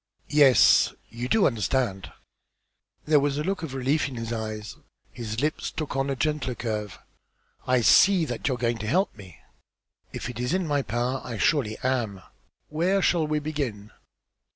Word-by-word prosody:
"Yes. 145 -4 +5
You 120 +2 -5
do 220 - +4
understand!" 105 -3 -1 0.9
There 150 -1 +4
was 140 0 0
a 150 - -1
look 195 +2 -2
of 150 -5 -6
relief 135 +4 +1
in 135 - -8
his 115 0 -4
eyes. 110 -2 -5 0.4
His 115 0 -5
lips 150 +1 -1
took 155 -4 -5
on 135 +1 0
a 135 - -1
gentler 145 -3 -1
curve. 105 -5 -4 0.7
"I 130 -1 +3
see 185 - +5
that 120 -3 -4
you 130 - +1
are - - -8
going 120 -1 -1
to 110 - -5
help 185 - +1
me." 95 - -13 0.7
"If - - -5
it 120 -1 -7
is 125 +8 0
in 185 -1 -1
my 145 -2 0
power, 120 +3 -2
I 115 -3 -6
surely 110 -2 +1
am. 120 -7 -1 0.5
Where 180 +5 +1
shall 165 -3 +2
we 155 0 0
begin?" 140 -9 -4
130 Hz, 175 wpm, -26 LUFS, 115-150 Hz, 0.9 s, Yes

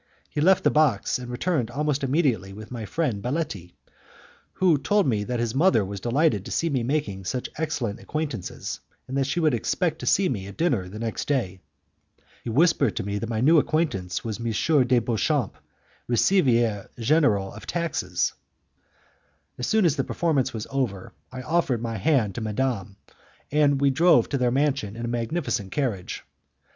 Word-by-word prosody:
He 145 - -2
left 185 +4 +4
the - - +4
box 145 -8 +2
and 125 -1 -7
returned 125 -1 -1
almost 145 +2 -1
immediately 130 - +1
with 110 +3 -10
my 115 -3 -5
friend 130 -10 -1
Baletti, 125 - -3 0.8
who 175 -6 +3
told 205 +7 +2
me 110 -5 +1
that 125 +1 -2
his 115 -1 -1
mother 140 - +3
was 100 +1 -6
delighted 120 - +1
to - - -8
see 165 -1 0
me 130 -3 +1
making 115 -7 -2
such 125 +6 -3
excellent 145 -9 -2
acquaintances, 150 - -4 0.3
and 130 - -5
that 135 -1 +1
she 155 - -1
would 155 -4 +3
expect 160 - 0
to - - -6
see 195 - +4
me 100 - -3
at 100 - -10
dinner 120 - 0
the 105 - -8
next 115 0 -3
day. 105 -10 -1 0.8
He - - -4
whispered 140 - +3
to 115 - -2
me 100 +1 -3
that 115 - -4
my 110 -1 -1
new 155 +5 +6
acquaintance 100 - -1
was 110 -1 -4
M. 125 +4 +2
de 125 0 +4
Beauchamp, 120 +2 0 0.5
Receiver 120 - +2
General 115 -6 +2
of 110 - -11
Taxes. 160 - -1 1.3
As 125 - -2
soon 220 -3 +3
as 160 -2 +2
the 135 - +1
performance 145 -6 0
was 110 -3 -5
over, 120 -9 -2 0.2
I 130 0 -7
offered 150 -5 +1
my 115 -1 -3
hand 110 -2 +2
to 120 - -5
madame, 110 -3 -2 0.6
and 145 -1 +3
we 140 0 +3
drove 165 +4 +4
to 140 - -1
their 125 -1 +2
mansion 135 -5 0
in 120 +1 -4
a - - -3
magnificent 120 - -2
carriage. 110 -10 -2
125 Hz, 175 wpm, -25 LUFS, 110-150 Hz, 1.3 s, new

